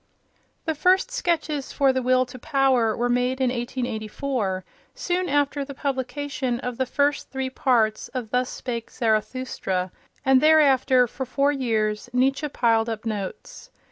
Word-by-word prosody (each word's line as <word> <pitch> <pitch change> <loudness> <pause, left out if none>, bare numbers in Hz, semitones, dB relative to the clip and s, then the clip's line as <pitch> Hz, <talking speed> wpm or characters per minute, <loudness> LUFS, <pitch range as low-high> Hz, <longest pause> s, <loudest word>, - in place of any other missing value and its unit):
The 320 - 0
first 375 +10 +2
sketches 320 - -1
for 275 -2 +3
"The 260 - 0
Will 255 +1 +3
to 255 +1 -11
Power" 255 -4 +2
were 240 - +1
made 250 +1 0
in 255 -2 +2
1884, 240 -4 -3 0.3
soon 360 +1 -1
after 285 0 +1
the 275 0 -8
publication 265 -2 -2
of 250 -1 -5
the 260 - +1
first 285 +2 0
three 265 -1 -3
parts 230 -5 +1
of 245 -4 -6
"Thus 250 0 +1
Spake 235 -2 -5
Zarathustra," 215 -5 -1 0.3
and 265 -1 +5
thereafter, 275 -5 +5
for 260 +2 -6
four 275 +3 +2
years, 225 -5 -1
Nietzsche 270 +4 +1
piled 230 -3 +2
up 225 0 -5
notes. 210 - -5
255 Hz, 145 wpm, -24 LUFS, 235-280 Hz, 0.3 s, and